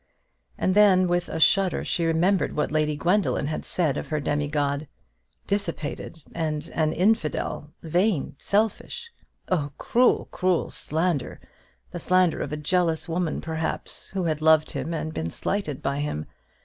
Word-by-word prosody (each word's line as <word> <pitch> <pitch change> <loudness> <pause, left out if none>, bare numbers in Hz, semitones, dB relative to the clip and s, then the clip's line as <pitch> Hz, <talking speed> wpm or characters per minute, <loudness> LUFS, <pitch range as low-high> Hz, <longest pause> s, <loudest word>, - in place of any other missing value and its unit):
And 185 - +1
then, 190 -3 +6
with 175 0 0
a - - -3
shudder, 190 +3 +3
she 170 - 0
remembered 170 +4 +2
what 150 - 0
Lady 150 -1 +1
Gwendoline 180 -1 +1
had 155 - -3
said 155 -6 0
of - - -4
her 155 -1 -1
demi 145 +1 -1
god. 145 0 -1 0.6
Dissipated 165 -5 -3
and 155 -1 -3
an 155 -1 +1
infidel; 180 -6 0
vain, 170 -3 +1
selfish! 220 - -1 0.4
Oh, 150 -6 +1
cruel, 245 +1 +3
cruel 180 -2 +1
slander, 160 -2 -1 0.5
the - - -5
slander 185 -1 +2
of - - -3
a 150 - -2
jealous 165 0 0
woman, 170 -1 -1
perhaps, 160 -1 -4
who 190 -1 -2
had 155 -2 -1
loved 155 0 +4
him 140 +2 -3
and 160 -1 -3
been 80 +1 -3
slighted 155 - -3
by 140 +1 -1
him. 145 - -2
165 Hz, 150 wpm, -25 LUFS, 150-185 Hz, 0.6 s, then